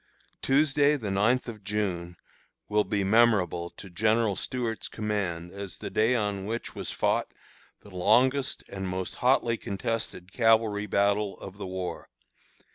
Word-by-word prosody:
Tuesday, 145 +1 +3
the 110 -8 -3
ninth 110 +7 +2
of 110 -3 -8
June, 95 -4 -2 0.5
will 105 0 +2
be 100 -1 -1
memorable 95 -5 +3
to 95 - -12
General 110 +3 +1
Stuart's 120 -1 -3
command 95 -6 -3
as 100 -2 -7
the - - -6
day 115 +4 +3
on 105 -4 -1
which 115 +3 -4
was - - -5
fought - - 0 0.5
the 100 -3 -14
longest 130 +9 +2
and 95 -1 -5
most 95 0 -3
hotly 125 -2 +2
contested 100 -3 -4
cavalry 110 -3 +3
battle 100 0 +1
of 100 +1 -10
the 100 - -5
war. 95 -1 -5
105 Hz, 140 wpm, -28 LUFS, 95-115 Hz, 0.5 s, Tuesday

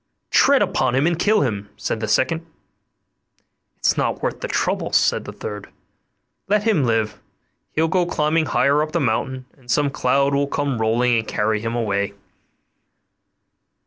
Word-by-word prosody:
'Tread - - +5
upon 120 - 0
him 135 +3 +2
and 170 0 +1
kill 215 +1 +3
him,' 105 -6 -2
said - - -3
the 110 - -3
second. 130 +9 +1 1.3
'It's - - +2
not - - -1
worth - - -2
the - - -3
trouble,' - - -1
said - - +2
the - - -6
third; 105 -1 -7 0.8
'let 210 +1 +2
him 210 -10 +2
live, 110 -3 -1 0.5
he'll 160 +1 +2
go 180 0 +1
climbing 155 -1 +1
higher 140 +4 +2
up 155 0 -3
the 170 - +1
mountain, 130 0 -1
and 125 -2 -22
some 140 +3 +2
cloud 140 +1 +1
will 140 0 +1
come 140 -4 -2
rolling 115 +2 +2
and 110 - -5
carry 105 +1 0
him 115 +1 -3
away. 100 -3 -1
130 Hz, 160 wpm, -21 LUFS, 110-155 Hz, 1.3 s, Tread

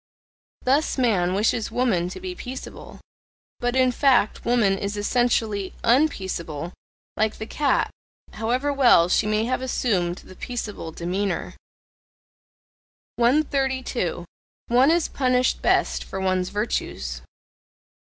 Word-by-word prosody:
Thus 280 +5 +1
man 190 -8 +2
wishes 215 +2 +1
woman 195 -9 0
to - - -8
be 370 -1 -5
peaceable: 260 -6 -9 0.6
but 245 +1 -1
in 255 -1 +4
fact 250 -4 +2
woman 235 -5 +3
is 200 +1 -4
ESSENTIALLY 215 -3 0
unpeaceable, 190 - 0 0.4
like 220 0 0
the 220 - -5
cat, 285 +5 0 0.4
however 250 +6 -1
well 240 -11 +5
she 210 - +2
may 215 +1 +1
have 255 +1 -1
assumed 200 -9 0
the 185 - -14
peaceable 210 -9 -5
demeanour. 180 +4 -3 1.6
132. 260 - 0 0.4
One 250 +4 +5
is 335 0 +2
punished 255 -1 +1
best - - +1
for 190 - -6
one's 185 -1 0
virtues. 65 - -3
230 Hz, 115 wpm, -24 LUFS, 190-255 Hz, 1.6 s, well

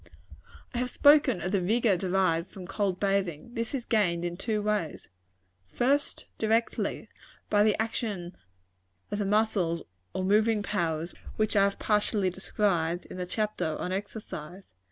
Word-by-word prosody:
I 240 - -1
have 250 0 -1
spoken 285 - +5
of 180 +3 -2
the 200 -2 +2
vigor 215 +2 +3
derived 180 -2 +1
from 185 -2 -9
cold 190 -1 -1
bathing. 195 0 -1
This 230 +2 -2
is 245 -3 -4
gained 175 -6 +1
in 175 0 -3
two 215 +3 -1
ways. 210 -7 -2 0.6
First, 275 - 0
directly, 225 +1 0 0.4
by 205 - +5
the 210 0 +3
action 210 -6 -3 0.8
of 205 - -2
the 205 - 0
muscles 200 -5 +1 0.3
or 185 - -2
moving 215 +2 +3
powers, 170 -5 -1 0.2
which 215 0 0
I 200 -1 +6
have 200 - -1
partially 210 -2 +1
described 175 -3 0
in - - -7
the 180 -1 -3
chapter 210 -6 -1
on 180 - -3
Exercise. 190 -3 -6
200 Hz, 150 wpm, -28 LUFS, 180-220 Hz, 0.8 s, I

